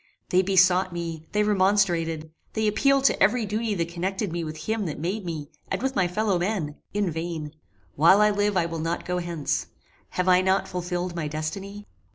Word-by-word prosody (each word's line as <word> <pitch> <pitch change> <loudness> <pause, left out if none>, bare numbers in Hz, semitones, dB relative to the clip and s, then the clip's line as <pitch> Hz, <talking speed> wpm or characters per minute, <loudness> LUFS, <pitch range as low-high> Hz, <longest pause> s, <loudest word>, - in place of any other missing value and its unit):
They 185 - +4
besought 185 -1 +4
me 165 -2 -5
they 210 0 +2
remonstrated 185 -6 +1 0.2
they 220 -1 +1
appealed 275 +6 +3
to 275 - +3
every 215 +4 +4
duty 215 +1 -1
that 170 -2 -1
connected 190 +2 -2
me 170 0 -2
with 155 0 -6
him 220 -3 -1
that 150 - -4
made 185 +7 -2
me, 155 -3 -5 0.2
and - - -1
with 265 +1 -2
my 190 -3 +3
fellow 195 0 0
men 175 -6 -2 0.2
in 205 -3 0
vain. 160 -2 -4 0.4
While 170 +7 +6
I 210 0 +5
live 205 -1 +1
I 170 - +3
will 165 -1 -4
not 165 +2 -2
go 180 0 -1
hence. 170 -4 -2 0.5
Have 180 0 +1
I 185 0 +6
not 190 +1 +1
fulfilled 180 0 -3
my 165 -3 -2
destiny? 195 +7 -5
180 Hz, 195 wpm, -25 LUFS, 165-205 Hz, 0.5 s, While